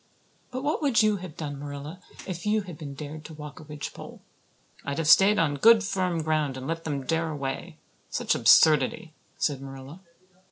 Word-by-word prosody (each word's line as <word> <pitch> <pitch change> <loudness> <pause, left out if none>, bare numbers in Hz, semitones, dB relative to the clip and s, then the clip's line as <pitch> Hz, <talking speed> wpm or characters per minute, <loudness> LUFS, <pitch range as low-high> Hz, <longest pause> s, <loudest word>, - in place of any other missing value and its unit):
But 255 +1 -5
what 300 +2 -1
would 270 -7 +3
you 215 -1 +3
have 175 -4 -9
done, 145 -3 -5
Marilla, 145 +4 -7 0.3
if 180 -2 -6
you 210 0 +1
had 180 -4 -9
been 145 -3 -8
dared 150 +2 -8
to 160 - -9
walk 150 -1 -9
a - - -11
ridgepole?" 150 -1 -8 0.6
"I'd 140 0 -4
have 165 -2 -1
stayed 195 +5 +6
on 145 -3 +1
good 225 +4 +6
firm 185 -4 -1
ground 155 -4 0
and 130 - -7
let 165 +2 -4
them 140 -4 -3
dare 160 +4 0
away. 140 -3 -5 0.3
Such - - 0
absurdity!" 155 +1 +4 0.2
said 140 -3 -1
Marilla. 135 +4 -10
155 Hz, 185 wpm, -26 LUFS, 145-185 Hz, 0.6 s, stayed